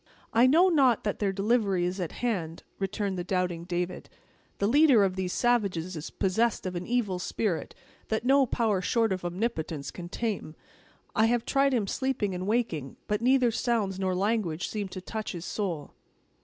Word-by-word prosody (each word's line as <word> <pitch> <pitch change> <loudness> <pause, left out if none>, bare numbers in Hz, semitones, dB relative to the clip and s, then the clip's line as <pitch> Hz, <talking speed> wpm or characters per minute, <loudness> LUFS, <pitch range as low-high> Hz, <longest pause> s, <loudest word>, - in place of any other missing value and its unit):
"I 235 +3 +6
know 330 +8 +6
not 270 - +3
that 205 - -2
their 200 -2 +1
delivery 200 -2 +1
is 180 +2 -2
at 175 -4 -3
hand," 170 -8 -2 0.2
returned 195 -1 -2
the - - -2
doubting 180 -2 -1
David; 180 0 -3 0.5
"the 200 - 0
leader 265 -1 +6
of 190 -1 +1
these 185 -1 -2
savages 195 -8 0
is 155 - -6
possessed 215 +4 0
of 185 -1 -3
an 175 +1 -4
evil 225 -7 0
spirit 185 -1 -2 0.3
that 220 +2 -1
no 270 0 +5
power 220 -5 +1
short 225 +1 +1
of 185 - -5
Omnipotence 175 -5 -3
can 175 -1 -8
tame. 200 -7 -3 0.6
I 220 - +4
have 240 0 +1
tried 275 0 +3
him 220 -4 +1
sleeping 235 -3 -1
and 180 +1 -4
waking, 205 - -1
but 210 +1 -1
neither 250 -1 +4
sounds 220 -5 0
nor 185 -1 0
language 190 -4 0
seem 210 -2 -3
to 185 0 -7
touch 215 +3 -5
his 175 0 -6
soul." 175 -8 -3
200 Hz, 180 wpm, -28 LUFS, 180-235 Hz, 0.6 s, I